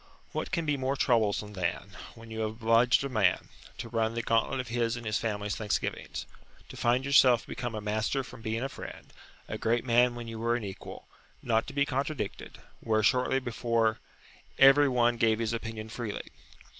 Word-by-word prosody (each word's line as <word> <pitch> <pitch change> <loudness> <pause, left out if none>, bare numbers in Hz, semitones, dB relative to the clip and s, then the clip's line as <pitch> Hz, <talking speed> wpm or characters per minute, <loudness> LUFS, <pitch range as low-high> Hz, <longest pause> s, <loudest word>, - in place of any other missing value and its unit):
What - - -3
can 170 -2 -1
be 150 -1 +1
more 135 +1 -1
troublesome 110 -5 +1
than, 95 +2 -3 0.2
when 115 -1 -12
you 110 - -5
have 110 -1 0
obliged 115 +3 +3
a - - -1
man, 105 -7 +1 0.3
to - - -6
run 115 -1 -1
the 115 - -2
gauntlet 115 +4 +1
of 125 -3 -4
his 115 0 0
and 120 - -8
his 110 0 0
family's 105 -3 -2
thanksgivings, 105 -3 -3 0.4
to - - -9
find 125 +2 +1
yourself 130 -4 +5
become 120 -2 -5
a 105 - -4
master 110 +6 -1
from 125 - -12
being 110 +1 -2
a - - 0
friend, - - -10 0.3
a - - -5
great 115 +2 +1
man 120 0 +4
when 120 -1 -7
you 115 -1 -6
were 115 +1 +1
an 120 - -3
equal; 95 -2 -8 0.4
not 115 -1 +1
to 140 - -7
be 140 0 +2
contradicted, 140 -5 -3 0.2
where 110 -1 +1
shortly 125 +3 +3
before 115 -3 0 0.6
every 135 +1 +7
one 120 -1 +2
gave 110 -1 +3
his 115 0 -1
opinion 115 -1 -5
freely? 110 -1 -6
115 Hz, 190 wpm, -29 LUFS, 110-125 Hz, 0.6 s, every